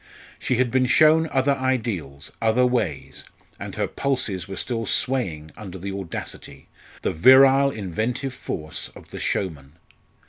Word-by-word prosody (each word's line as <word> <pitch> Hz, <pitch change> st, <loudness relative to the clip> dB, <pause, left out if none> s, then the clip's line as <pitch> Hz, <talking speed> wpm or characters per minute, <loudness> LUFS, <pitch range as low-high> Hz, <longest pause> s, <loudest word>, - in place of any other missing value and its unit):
She 125 Hz, -, 0 dB
had 125 Hz, 0 st, +1 dB
been 130 Hz, -1 st, +2 dB
shown 155 Hz, +4 st, +5 dB
other 135 Hz, +1 st, +2 dB
ideals 115 Hz, -, -2 dB
other 115 Hz, +3 st, +3 dB
ways 105 Hz, -, -2 dB, 0.4 s
and -, -, -7 dB
her -, -, 0 dB
pulses 125 Hz, -11 st, -2 dB
were 95 Hz, -, -6 dB
still 115 Hz, +2 st, -3 dB
swaying 90 Hz, -13 st, -1 dB
under 95 Hz, -3 st, -8 dB
the 95 Hz, +2 st, -5 dB
audacity 80 Hz, -6 st, -7 dB, 0.3 s
the -, -, 0 dB
virile 135 Hz, -, +6 dB
inventive 115 Hz, -, -3 dB
force 75 Hz, -10 st, -6 dB
of -, -, -14 dB
the -, -, -8 dB
showman. 75 Hz, -7 st, -3 dB
115 Hz, 140 wpm, -23 LUFS, 90-130 Hz, 0.4 s, virile